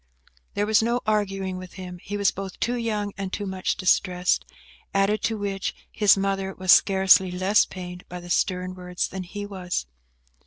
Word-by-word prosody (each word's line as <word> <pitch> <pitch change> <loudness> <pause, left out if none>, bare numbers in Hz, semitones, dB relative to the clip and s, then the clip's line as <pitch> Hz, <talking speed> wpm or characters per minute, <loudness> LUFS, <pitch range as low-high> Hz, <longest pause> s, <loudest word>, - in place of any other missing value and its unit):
There 205 - +1
was 220 +1 +4
no 235 +1 +1
use 245 - -1
arguing 195 -3 0
with 185 0 -9
him; 180 -2 -8
he 205 +2 -4
was 200 -1 +3
both 195 -1 -7
too 240 - 0
young 210 -4 -2
and 195 -1 -3
too 205 - -3
much 190 -1 -1
distressed; 180 -1 +2 0.5
added 200 +2 +2
to 225 - 0
which, 200 -1 -3 0.2
his 210 -2 +5
mother 195 0 -1
was 185 -1 +2
scarcely 190 -1 +6
less 185 +3 +3
pained 180 -1 -8
by 180 - -6
the 175 0 -8
stern 185 0 0
words 180 -1 -3
than 190 - -6
he 205 +3 -6
was. 185 - -3
195 Hz, 185 wpm, -25 LUFS, 185-205 Hz, 0.5 s, scarcely